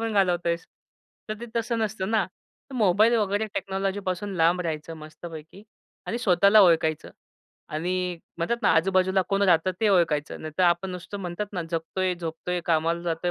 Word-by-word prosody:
पण 225 Hz, -1 st, -2 dB
घालवतोयेस. 175 Hz, -4 st, +1 dB, 0.6 s
तर 215 Hz, -, -2 dB
ते 235 Hz, -, -6 dB
तसं 230 Hz, 0 st, -1 dB
नसतं 215 Hz, -2 st, -2 dB
ना. 215 Hz, -4 st, +2 dB, 0.5 s
तर -, -, -8 dB
मोबाईल 215 Hz, +2 st, +4 dB
वगैरे 210 Hz, 0 st, 0 dB
टेक्नॉलॉजीपासून 195 Hz, 0 st, -2 dB
लांब 170 Hz, +2 st, +3 dB
राहायचं 165 Hz, -1 st, -4 dB
मस्तपैकी 160 Hz, +3 st, -10 dB, 0.4 s
आणि 235 Hz, -, -2 dB
स्वतःला 200 Hz, 0 st, +5 dB
ओळखायचं 160 Hz, -3 st, +2 dB, 0.6 s
आणि 165 Hz, +4 st, -2 dB, 0.5 s
म्हणतात 205 Hz, +8 st, 0 dB
ना, -, -, +4 dB
आजूबाजूला 185 Hz, +3 st, +3 dB
कोण 200 Hz, 0 st, +1 dB
राहतं 180 Hz, -1 st, +4 dB
ते 220 Hz, -, +3 dB
ओळखायचं, 165 Hz, -6 st, +1 dB
नाहीतर 155 Hz, +4 st, -2 dB
आपण 175 Hz, +2 st, +2 dB
नुसतं 180 Hz, +3 st, -7 dB
म्हणतात 180 Hz, +3 st, -4 dB
ना, 175 Hz, -3 st, -2 dB
जगतोय, 180 Hz, +3 st, -1 dB
झोपतोय, 175 Hz, +1 st, -4 dB
कामाला 165 Hz, +1 st, +1 dB
जातोय, 170 Hz, +1 st, -1 dB
180 Hz, 155 wpm, -26 LUFS, 165-200 Hz, 0.6 s, स्वतःला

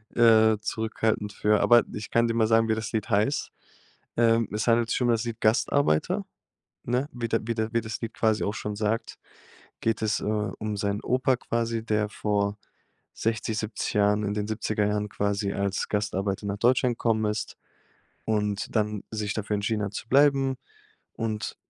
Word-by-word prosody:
äh, 110 Hz, -2 st, +6 dB
zurückhaltend 110 Hz, -1 st, -1 dB
für. 105 Hz, +1 st, +2 dB
Aber 120 Hz, 0 st, +6 dB
ich 105 Hz, +1 st, -6 dB
kann 115 Hz, 0 st, +3 dB
dir 115 Hz, -, 0 dB
mal 115 Hz, -1 st, +2 dB
sagen, 115 Hz, 0 st, +4 dB
wie 110 Hz, -, +2 dB
das 110 Hz, 0 st, -4 dB
Lied 110 Hz, -1 st, -2 dB
heißt. 110 Hz, +7 st, +1 dB, 0.7 s
Ähm, 115 Hz, -1 st, +3 dB
es 105 Hz, +2 st, -2 dB
handelt 115 Hz, 0 st, +3 dB
sich -, -, 0 dB
um 125 Hz, -, +2 dB
das 115 Hz, -1 st, +2 dB
Lied: 115 Hz, -1 st, -5 dB
„Gastarbeiter“, 110 Hz, -, +2 dB, 0.6 s
ne? 125 Hz, +4 st, -1 dB
Wie 120 Hz, -1 st, -3 dB
der 115 Hz, -, +1 dB
wie 115 Hz, -, -1 dB
der 110 Hz, 0 st, -2 dB
wie 115 Hz, -, +2 dB
das 110 Hz, 0 st, -5 dB
Lied 115 Hz, -1 st, -4 dB
quasi 110 Hz, -1 st, +1 dB
auch 100 Hz, -, -1 dB
schon 105 Hz, -1 st, -4 dB
sagt, 110 Hz, +2 st, -2 dB, 0.6 s
geht 115 Hz, 0 st, 0 dB
es, 110 Hz, 0 st, +1 dB
äh, -, -, -8 dB
um 105 Hz, 0 st, -2 dB
seinen 100 Hz, 0 st, -1 dB
Opa 130 Hz, +1 st, +2 dB
quasi, 115 Hz, -2 st, -2 dB
der 105 Hz, -1 st, 0 dB
vor 105 Hz, -1 st, -1 dB, 0.6 s
60, 110 Hz, -1 st, -2 dB
70 110 Hz, 0 st, -3 dB
Jahren, 105 Hz, 0 st, +3 dB
in 105 Hz, 0 st, -1 dB
den 105 Hz, 0 st, -2 dB
70er 110 Hz, -1 st, -1 dB
jahren 105 Hz, 0 st, -1 dB
quasi 100 Hz, 0 st, -1 dB
als 100 Hz, 0 st, -2 dB
Gastarbeiter 100 Hz, -1 st, -1 dB
nach 100 Hz, -, -2 dB
Deutschland 125 Hz, +1 st, +3 dB
gekommen 110 Hz, -2 st, +1 dB
ist 105 Hz, 0 st, -4 dB, 0.7 s
und 105 Hz, -1 st, -1 dB
dann 105 Hz, -2 st, 0 dB
sich 105 Hz, -2 st, -2 dB
dafür 105 Hz, -1 st, -2 dB
entschieden 105 Hz, +1 st, -1 dB
hat, 100 Hz, 0 st, -4 dB
zu 115 Hz, -, -6 dB
bleiben. 135 Hz, -1 st, +4 dB, 0.6 s
Und 110 Hz, -2 st, -3 dB
110 Hz, 180 wpm, -26 LUFS, 105-115 Hz, 0.7 s, äh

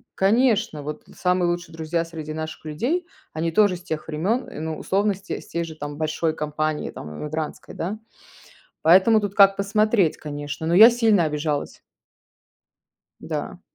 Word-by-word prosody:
конечно, 215 Hz, -, +2 dB
вот 150 Hz, +1 st, -6 dB
самые 180 Hz, -1 st, +1 dB
лучшие 175 Hz, -1 st, -4 dB
друзья 165 Hz, +1 st, -2 dB
среди 160 Hz, -2 st, -7 dB
наших 155 Hz, 0 st, -6 dB
людей- 255 Hz, -, -2 dB, 0.3 s
они 165 Hz, +1 st, -1 dB
тоже 205 Hz, -1 st, +4 dB
с 175 Hz, -, -16 dB
тех 155 Hz, -2 st, -4 dB
времен, 195 Hz, +12 st, 0 dB, 0.2 s
ну, 160 Hz, -1 st, -3 dB
условно, 200 Hz, +2 st, +1 dB
с 195 Hz, -, -12 dB
те 195 Hz, -, -5 dB
с -, -, -16 dB
тей 170 Hz, -, -2 dB
же 160 Hz, -1 st, -8 dB
там 145 Hz, -1 st, -6 dB
большой 155 Hz, +1 st, -1 dB
компании, 155 Hz, 0 st, -2 dB
там, 75 Hz, -, -9 dB
эмигрантской, 155 Hz, 0 st, -5 dB
да. 190 Hz, +6 st, -3 dB, 0.9 s
Поэтому 190 Hz, +7 st, +6 dB
тут 205 Hz, -2 st, -3 dB
как 195 Hz, -1 st, +6 dB
посмотреть, 200 Hz, -2 st, +2 dB
конечно, 145 Hz, +1 st, -5 dB
но 170 Hz, -, +2 dB
я 220 Hz, +5 st, +10 dB
сильно 225 Hz, -6 st, +3 dB
обижалась. 150 Hz, -1 st, -2 dB, 1.4 s
Да. -, -, -5 dB
165 Hz, 155 wpm, -23 LUFS, 155-200 Hz, 1.4 s, я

